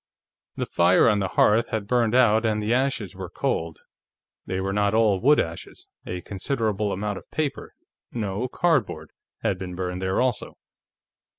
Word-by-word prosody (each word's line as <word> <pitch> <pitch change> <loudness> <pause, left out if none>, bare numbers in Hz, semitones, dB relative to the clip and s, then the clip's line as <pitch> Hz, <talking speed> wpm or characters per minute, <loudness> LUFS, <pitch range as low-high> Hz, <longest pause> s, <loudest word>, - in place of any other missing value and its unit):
The - - -2
fire 85 +2 +4
on 105 -2 +3
the 95 - 0
hearth 110 +5 +3
had 110 -2 -2
burned 120 0 +1
out 115 -3 +4
and 110 -2 +1
the 105 +2 0
ashes 130 -7 -1
were - - -7
cold. 80 0 -3 0.7
They 95 - -2
were 95 +1 -2
not 105 +1 +1
all 110 -4 +3
wood 145 +8 +4
ashes; 80 0 -5 0.2
a 90 0 -4
considerable 105 +1 -2
amount 100 +1 -3
of - - -22
paper 155 -3 -3 0.4
no, 105 +1 -3
cardboard 160 0 0 0.3
had - - 0
been 90 -1 -6
burned 90 0 -4
there 95 0 0
also. 125 -3 -1
105 Hz, 165 wpm, -24 LUFS, 95-120 Hz, 0.7 s, fire